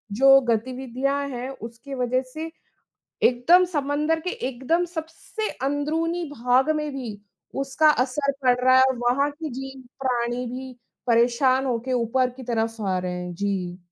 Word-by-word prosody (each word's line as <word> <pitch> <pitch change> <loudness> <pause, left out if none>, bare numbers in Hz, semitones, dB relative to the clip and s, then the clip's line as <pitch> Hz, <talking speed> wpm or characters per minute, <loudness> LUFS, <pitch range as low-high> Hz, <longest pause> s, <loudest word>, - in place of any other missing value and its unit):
जो 270 +3 +7
गतिविधियाँ 260 +4 -1
हैं 250 0 -5
उसके 240 +2 -8
वजह 255 0 +1
से, 320 +1 -5 0.7
एकदम 330 +10 +5
समंदर 295 +3 0
के 360 - -4 0.2
एकदम 300 +8 0
सबसे 330 +6 -5 0.2
अंदरूनी 320 +5 -1
भाग 250 +3 +2
में 300 -1 -3
भी 235 -7 -6 0.4
उसका 275 +3 +3
असर 280 +2 -1
पड़ 250 -1 +5
रहा 255 0 +6
है - - +7
और 260 -1 +2
वहाँ 250 +4 +2
के 310 +1 -6
जीव-प्राणी 250 -2 -3
भी 255 +1 -6 0.3
परेशान 245 +3 +3
हो 250 -3 +1
के 260 - -1
ऊपर 250 +1 +1
की 260 - -8
तरफ़ 225 -2 -2
आ 190 -2 0
रहे 180 0 -3
हैं। 180 0 -5
जी। 185 -2 -2
260 Hz, 150 wpm, -24 LUFS, 240-285 Hz, 0.7 s, जो